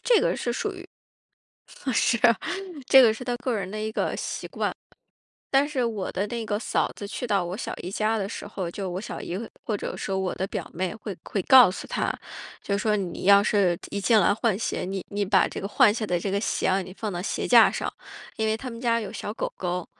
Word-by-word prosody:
这 485 -2 +5
个 - - +1
是 240 - -2
属 405 - -2
于 365 -1 -10 1.1
是， 235 0 +2 0.7
这 270 -1 +8
个 230 -3 +6
是 250 - -8
她 245 0 -1
个 250 0 -1
人 190 -2 -4
的 215 +1 -4
一 215 0 -2
个 - - -1
习 - - -4
惯。 - - -2 0.8
但 275 +2 +5
是 275 -4 -1
我 220 -5 -2
的 190 +3 -1
那 230 +1 -4
个 205 -1 -1
嫂 215 - 0
子 205 - -7
去 235 +4 -5
到 200 -4 +2
我 175 +3 -4
小 - - -4
姨 180 - -6
家 215 +2 +1
的 195 -2 -2
时 205 - -6
候， 190 -4 -4
就 195 +1 -4
我 180 +2 -4
小 - - -6
姨 175 - -4 0.3
或 215 - -1
者 - - -5
说 195 - -2
我 190 -1 -1
的 190 - -2
表 - - -5
妹 185 +3 -2
会 215 -2 -6
会 200 - -1
告 255 +2 +8
诉 185 - -6
她， - - -1 0.5
就 200 - 0
说： 210 +1 +1
“你 190 -4 -4
要 200 +1 +7
是 195 -5 +2
一 200 - -3
进 220 +3 +4
来 205 - +4
换 220 -2 0
鞋， 225 - -2
你 190 0 -4
你 205 0 -1
把 190 -1 +4
这 - - -6
个 195 - -4
换 210 0 +5
下 220 -1 -2
的 180 -4 0
这 190 +3 -3
个 200 - +1
鞋 215 - -1
啊， 190 +1 +2
你 185 0 -9
放 215 -2 -3
到 175 -1 -3
鞋 190 - -2
架 - - +8
上。” - - -3 0.5
因 220 - 0
为 220 - +2
他 255 +3 -6
们 230 -1 -8
家 230 -1 +1
有 200 -3 -6
小 210 -1 -5
狗 - - -3
狗。 180 -1 -2
205 Hz, 260 characters per minute, -26 LUFS, 190-230 Hz, 1.1 s, 这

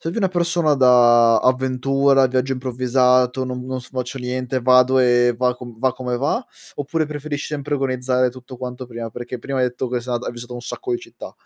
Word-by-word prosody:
sei 165 - -3
più 180 - -4
una 200 - +2
persona 170 -3 +1
da 120 -3 +5
avventura, 130 +2 +2
viaggio 130 +1 -1
improvvisato, 125 0 +1
"Non 125 -1 -5
non 130 0 -4
s 125 - -15
faccio 130 0 -4
niente, 125 +1 -3
vado 125 +1 +4
e 120 -1 +4
va 125 -1 +1
com 120 -2 -11
va 130 0 +1
come 125 -1 -3
va", 145 - -1 0.3
oppure 150 +2 -2
preferisci 150 -1 -5
sempre 145 -1 -3
organizzare 130 -1 0
tutto 130 +1 -11
quanto 125 0 -7
prima? 115 -1 -6
Perché 120 +2 -7
prima 135 +3 -4
hai 125 -1 +2
detto 125 +1 -5
che 125 0 -2
s 120 - -12
ata 120 -1 0
che 120 - -9
hai - - -3
visitato 120 +1 -9
un 120 - -6
sacco 375 - -6
di 360 - 0
città. 360 - -11
130 Hz, 215 wpm, -20 LUFS, 125-135 Hz, 0.3 s, da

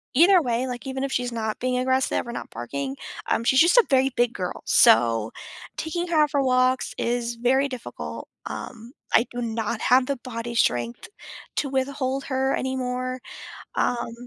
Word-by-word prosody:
Either 350 +5 +6
way, 245 0 -1
like, 245 +1 -6
even 265 0 -3
if 275 - -2
she's 245 -2 -1
not 220 -2 -3
being 255 0 0
aggressive, 260 0 +1
or - - -4
not - - -6
barking, 135 +2 -4 0.3
um, 230 - +1
she's 265 +3 +4
just 345 - +5
a 485 - +7
very 265 0 +4
big 240 -1 +2
girl, 180 -1 -4
so 115 -1 +4 0.5
taking 345 +2 -3
her 335 -2 0
out 295 - -1
for 280 -1 +2
walks 255 0 +2
is 235 0 -1
very 260 +4 +2
difficult, 120 - -7 0.2
um, 230 +2 -7 0.2
I 230 - +5
do 245 - -4
not 225 -1 -2
have 255 +1 +4
the 275 0 -2
body 235 -1 -6
strength 120 - 0 0.5
to 280 - 0
withhold 270 0 -1
her 265 0 0
anymore. 255 -1 -2 0.6
Um 235 -1 0
255 Hz, 170 wpm, -24 LUFS, 230-265 Hz, 0.6 s, a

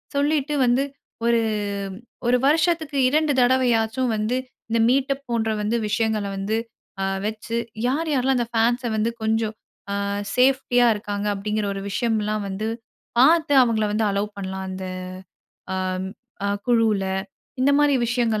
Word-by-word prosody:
சொல்லிட்டு 295 0 +1
வந்து 245 +3 +3 0.4
ஒரு, 235 0 +4 0.9
1 250 +1 +4
வருஷத்துக்கு 315 -1 +2
2 305 +1 +2
தடவையாச்சும் 245 -1 +2
வந்து 215 +4 0 0.3
இந்த 230 - +1
மீட்டப் 275 +1 +1
போன்ற 230 -2 0
வந்து 210 +3 0
விஷயங்கள 220 0 0
வந்து, 210 +3 -1 0.4
அ - - 0 0.2
வச்சு 220 +2 -3 0.3
யார், 315 +5 0
யார்லாம் 265 -1 +2
அந்த 240 -1 0
ஃபேன்ஸ 240 +3 +2
வந்து 220 +2 +1
கொஞ்சம் 220 0 0 0.5
அ - - -2 0.3
சேஃப்டியா 250 -1 +4
இருக்காங்க, 205 -1 -4
அப்டிங்கிற 210 +1 -2
ஒரு 195 - -5
விஷயம்லாம் 215 -1 0
வந்து 205 +3 -3 0.5
பாத்து 315 +2 +5
அவுங்கள 220 -3 +1
வந்து 215 +1 +1
அல்லோவ் 200 +1 -1
பண்லாம். 190 0 -4
அந்த 185 0 -5 0.9
ஆம் 185 0 -2 0.4
அ - - +1 0.2
குழுவுல. 225 -5 +3 0.6
இந்தமாரி 285 +1 +4
விஷயங்கள் 235 -3 +1
230 Hz, 130 wpm, -23 LUFS, 215-260 Hz, 0.9 s, பாத்து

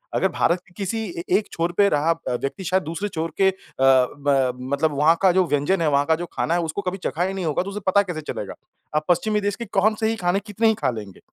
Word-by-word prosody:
अगर - - +3
भारत 175 +1 +1
के 175 - -22
किसी 205 +2 -2 0.2
ए - - -4
एक 215 - -3
छोर 170 +1 -1
पे 200 -1 +6
रहा 150 +1 +2 0.2
व्यक्ति 135 +9 -3
शायद 185 +1 +1
दूसरे 170 +7 -4
छोर 165 -1 -3
के 190 - +6
अ, - - -3 0.3
ब 135 0 +3
मतलब 140 +4 0
वहाँ 155 +3 +5
का 190 -2 +5
जो 185 0 +3
व्यंजन 150 +6 +1
है 155 - +2
वहाँ 140 0 +2
का 160 - +3
जो 175 +2 -5
खाना 165 - 0
है 175 - +2
उसको 165 +5 -3
कभी 185 +1 -3
चखा 175 - 0
ही 190 +1 -1
नहीं 190 -3 -3
होगा 155 +2 0
तो 195 - -6
उसे 210 - -4
पता 200 +2 +5
कैसे 175 -5 -5
चलेगा? - - -5 0.4
आप 155 0 +1
पश्चिमी 210 +5 +2
देश 205 0 -1
के 235 - -6
कौन 210 +1 +2
से 220 - +1
ही 225 - 0
खाने 180 -2 0
कितने 215 +2 0
ही 220 - +5
खा 215 - -1
लेंगे? 105 -4 -8
175 Hz, 265 wpm, -23 LUFS, 150-195 Hz, 0.4 s, पे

